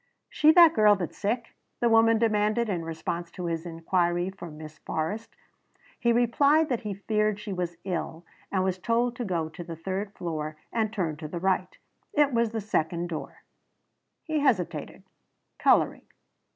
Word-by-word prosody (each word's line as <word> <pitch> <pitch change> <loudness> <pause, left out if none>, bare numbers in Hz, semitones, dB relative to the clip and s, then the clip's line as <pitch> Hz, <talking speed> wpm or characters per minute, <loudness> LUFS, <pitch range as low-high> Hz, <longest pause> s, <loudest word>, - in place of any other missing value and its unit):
"She 305 +1 +5
the 340 0 +9
girl 210 -4 +6
that's 180 -4 -5
sick?" 230 +3 -2 0.3
the 240 - +2
woman 225 0 +5
demanded 220 0 +1
in 175 -4 -1
response 165 +1 -4
to 180 - -5
his 165 0 -3
inquiry 175 +2 0
for 175 -3 -9
Miss 155 0 -11
Forrest. 205 +9 -4 0.6
He 235 - +2
replied 280 +7 +3
that 245 -4 0
he 210 -3 -4
feared 215 +1 0
she 210 -1 -5
was 175 -2 -3
ill 175 -2 -4 0.3
and 190 -2 +1
was 185 -1 -1
told 235 +4 +1
to 245 - -2
go 170 -6 -1
to 160 +2 -8
the 165 -1 -7
third 195 +4 -4
floor 155 -3 -4 0.2
and 220 -2 0
turn 170 -8 -2
to 155 0 -6
the 170 +3 -5
right. 185 0 0 0.4
It 290 -3 +3
was 235 -1 +2
the 225 0 -3
second 170 -3 -1
door. 160 - -7 0.8
He 315 -2 -1
hesitated, 240 - 0 0.6
coloring. - - +3
195 Hz, 165 wpm, -27 LUFS, 170-230 Hz, 0.8 s, the